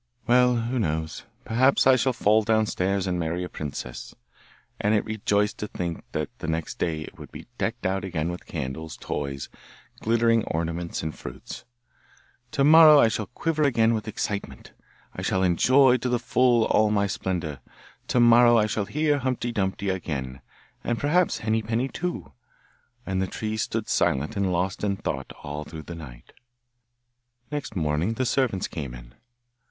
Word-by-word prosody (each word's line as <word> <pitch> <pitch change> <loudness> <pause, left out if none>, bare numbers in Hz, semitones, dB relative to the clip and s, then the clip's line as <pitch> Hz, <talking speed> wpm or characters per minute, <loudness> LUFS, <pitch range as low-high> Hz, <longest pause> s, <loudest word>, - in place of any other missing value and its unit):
'Well, 125 0 +4
who 120 +2 -1
knows? 80 -5 -2 0.2
Perhaps 130 +4 +3
I 130 0 +7
shall 130 +1 +2
fall 110 -2 +3
downstairs 100 -3 +1
and 90 -2 -1
marry 85 +2 -2
a 90 - -5
princess.' 70 -4 -7 0.6
And 105 +2 +2
it 105 - +1
rejoiced 105 -1 0
to 105 - -3
think 85 -4 -4
that - - -2
next 80 0 -3
day 80 -2 -1
it - - -10
would - - -10
be - - -10
decked 120 +1 -2
out 95 +1 0
again 85 -3 -2
with 90 - -9
candles, 75 +1 -5
toys, 70 -2 -4 0.5
glittering 115 0 +2
ornaments, 85 +1 -3
and 80 -1 -3
fruits. - - -9 0.8
'To 135 - 0
morrow 155 +1 +9
I 115 - +5
shall 110 -2 -3
quiver 155 +5 -2
again 115 -5 +3
with 110 -1 -3
excitement. 105 -1 -5 0.4
I - - -6
shall 95 0 0
enjoy 125 +9 +5
to 125 - -3
the 125 - +2
full 120 0 +3
all 110 0 +3
my 100 -1 +2
splendour. 85 -7 -3 0.5
To 125 - +1
morrow 120 0 +7
I 105 - +4
shall 105 -1 -1
hear 150 +3 +1
Humpty 125 -2 -2
Dumpty 100 -2 -1
again, 65 -8 -4 0.4
and 120 - -1
perhaps 165 +7 +2
Henny 110 0 +1
Penny 115 +4 -1
too.' 145 - -5 0.7
And 95 -1 -1
the 95 - 0
tree 110 +3 -4
stood 110 - -2
silent 70 +3 +1
and 100 -2 0
lost 90 +3 -1
in 100 -1 +1
thought 65 -7 -4
all 75 +1 -5
through 80 +1 -9
the 85 - -8
night. 70 -8 -11 1.2
Next 145 -6 -4
morning 80 +4 0
the 130 - -1
servants 120 -6 0
came 70 -6 -6
in. - - -13
100 Hz, 165 wpm, -25 LUFS, 80-120 Hz, 1.2 s, morrow